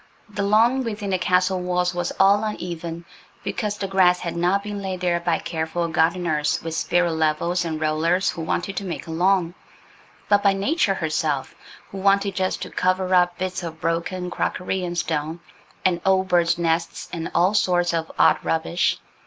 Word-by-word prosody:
The 205 -1 -4
lawn 225 +6 +3
within 210 -4 -4
the 185 - +1
castle 185 +1 +2
walls 180 0 0
was 175 0 -2
all 200 +2 +5
uneven 170 -5 -5 0.4
because 210 -2 -3
the 195 - -3
grass 185 -2 +3
had 170 - -4
not 180 +4 +1
been 205 -1 -5
laid 190 -2 -4
there 175 -1 +1
by 170 0 0
careful 165 +1 -3
gardeners, 160 -2 +1
with 165 -1 -4
spirit 175 +1 +1
levels 160 +3 0
and 160 -2 -3
rollers, 160 +4 +1
who 170 - -7
wanted 175 +4 -2
to - - -2
make 180 -3 -5
a 165 - -7
lawn, 175 +1 +2 0.7
but 205 -1 +4
by 200 -1 +4
Nature 200 - +1
herself, 155 -4 -1 0.4
who 195 - -6
wanted 200 0 +2
just 185 0 -1
to - - -8
cover 185 0 0
up 175 -1 +3
bits 185 +1 -3
of 165 -2 -7
broken 175 +2 -2
crockery 185 +1 -2
and 175 -1 -4
stone, 160 0 -2 0.5
and 175 -2 +2
old 190 0 +2
birds' 170 -1 +3
nests, 170 0 -1
and 165 -1 -4
all 180 +4 +3
sorts 175 -4 +2
of 160 -1 -2
odd - - +4
rubbish. 165 +2 0
180 Hz, 180 wpm, -23 LUFS, 170-190 Hz, 0.7 s, all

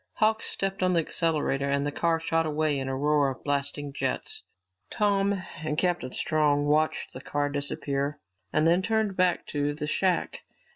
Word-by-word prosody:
Hawks 220 +1 +1
stepped 195 0 -2
on 185 0 +3
the 170 - +4
accelerator 150 -4 0
and 140 0 +1
the 145 - -1
car 165 +2 +1
shot 165 0 0
away 150 -2 +1
in 135 - -3
a 130 - -2
roar 145 0 +3
of 130 - -7
blasting 145 0 -2
jets. 435 - -2 0.5
Tom 200 -2 +1 0.2
and 150 -1 -2
Captain 175 -8 0
Strong 145 -1 +1
watched 150 0 +1
the 130 - -8
car 145 +1 -1
disappear 140 0 -2 0.3
and 155 - +2
then 170 +3 +4
turned 220 -1 0
back 180 -1 +2
to 145 0 -1
the 150 0 -4
shack. 180 +3 0
155 Hz, 175 wpm, -27 LUFS, 145-180 Hz, 0.5 s, the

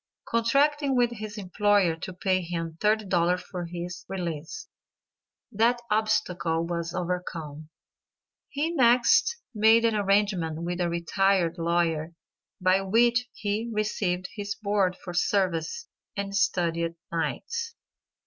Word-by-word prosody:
Contracting 275 +4 +2
with 240 -1 +3
his 215 -2 -7
employer 200 -2 +2
to 165 - -7
pay 185 +1 0
him 165 -2 -4
$30 190 -5 +2
for 180 -2 -6
his 175 +1 -6
release, 175 - -5 0.8
that 230 +4 +2
obstacle 185 -6 +1
was 170 0 -3
overcome. 170 -4 -4 0.8
He 300 +4 -1
next 250 - +4 0.2
made 225 +1 +5
an 230 - +3
arrangement 195 -6 +1
with 175 +1 -2
a 175 - +1
retired 170 0 +1
lawyer, 165 -1 0 0.4
by 185 +1 +3
which 240 +5 +3
he 215 +2 -2
received 195 -4 -1
his 200 -1 -4
board 200 -4 0
for 175 - -8
services, 185 - 0 0.3
and 200 0 -3
studied 170 -3 0 0.2
nights. 460 - -3
190 Hz, 115 wpm, -27 LUFS, 170-215 Hz, 0.8 s, made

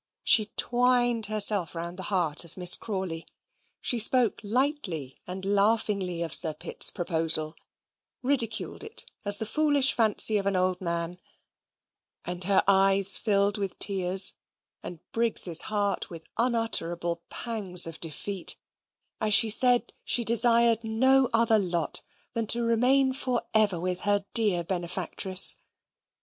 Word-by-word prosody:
She 215 -3 +4
twined 245 -2 0
herself 205 -5 +2
round 170 +2 -8
the 190 - -7
heart 175 -6 -2
of 170 - -17
Miss 180 -1 +6
Crawley. 190 -6 -6 0.5
She 240 - -1
spoke 230 -2 +3
lightly 210 - -4
and 190 +1 -7
laughingly 200 -3 -1
of 165 - -6
Sir 160 -3 +3
Pitt's - - 0
proposal, 160 -2 -3 0.7
ridiculed 245 - -1
it 445 +1 -4 0.2
as 205 -1 +2
the 220 - -5
foolish 290 +1 +1
fancy 215 -1 +3
of 200 - -5
an 200 - -1
old 185 0 -1
man; 170 0 -4 1.1
and 180 0 -3
her 195 0 +1
eyes 195 0 +3
filled 205 -1 -1
with 195 -2 -6
tears, 190 -1 +3 0.5
and 175 - -10
Briggs's 225 -7 +3
heart 205 -2 -3
with 165 -2 -12
unutterable 175 -8 -1
pangs 200 -7 +1
of 165 -1 -8
defeat, 175 +4 -1 0.6
as 215 -2 +3
she 225 -2 +4
said 245 0 +4
she 240 - +1
desired 235 0 +3
no 260 +4 +1
other 225 -1 +1
lot 175 -5 0 0.3
than 230 -1 -4
to 235 +2 +4
remain 255 +4 0
for 255 -2 -3
ever 210 -5 +2
with 180 +1 -4
her 205 0 -1
dear 205 -7 +2
benefactress. 185 +1 0
200 Hz, 135 wpm, -25 LUFS, 180-230 Hz, 1.1 s, Miss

